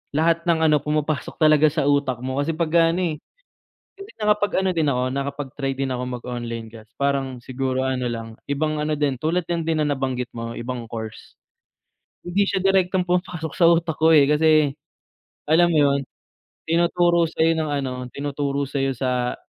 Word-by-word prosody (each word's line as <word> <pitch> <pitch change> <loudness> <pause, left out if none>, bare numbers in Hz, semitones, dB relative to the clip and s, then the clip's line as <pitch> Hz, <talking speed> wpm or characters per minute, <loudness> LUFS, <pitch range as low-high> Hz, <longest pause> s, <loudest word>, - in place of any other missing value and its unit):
lahat 165 +2 +1
ng 160 -1 +3
ano, 150 - +4
pumapasok 150 0 -2
talaga 155 -1 +5
sa 155 0 0
utak 140 -4 +1
mo 130 +1 -2
kasi 155 +3 -1
pagka 165 0 +3
ano, 185 - -1
eh, - - -14 0.8
hindi 395 +1 -11
nakapag-ano 205 -2 +1
din 165 -3 0
ako, 125 -2 0
nakapag-try 140 0 -3
din 135 0 -2
ako 125 0 -2 0.2
mag-online 120 -2 -5
class 110 -1 -14
parang 135 -3 -1
siguro 130 +1 -2
ano 130 -1 -1
lang, 115 -2 -5
ibang 155 +2 -1
ano 150 +1 -1
din, 145 -3 0
tulad 160 +7 0
lang 170 -2 -1
din 160 -1 0
na 150 - +1
nabanggit 125 -2 -2
mo 115 0 -6
ibang 120 0 -5
course. 110 -1 -8 0.9
Hindi 180 +3 +1
siya 190 - -1
direktong 185 -1 +2
pumapasok 175 -3 -2
sa 175 - +3
utak 170 -2 +1
ko, 160 +1 +4
eh, 145 -3 +6
kasi 150 -2 +3 0.7
alam 170 +3 +4
mo 160 - +2
'yun, 140 -1 +3 0.7
tinuturo 170 +1 +2
sa'yo 160 +1 +2
ng 160 -2 -2
ano 140 -2 -1 0.2
tinuturo 140 +1 -2
sayo 135 0 -1
sa 125 -1 -1
145 Hz, 170 wpm, -22 LUFS, 130-165 Hz, 0.9 s, eh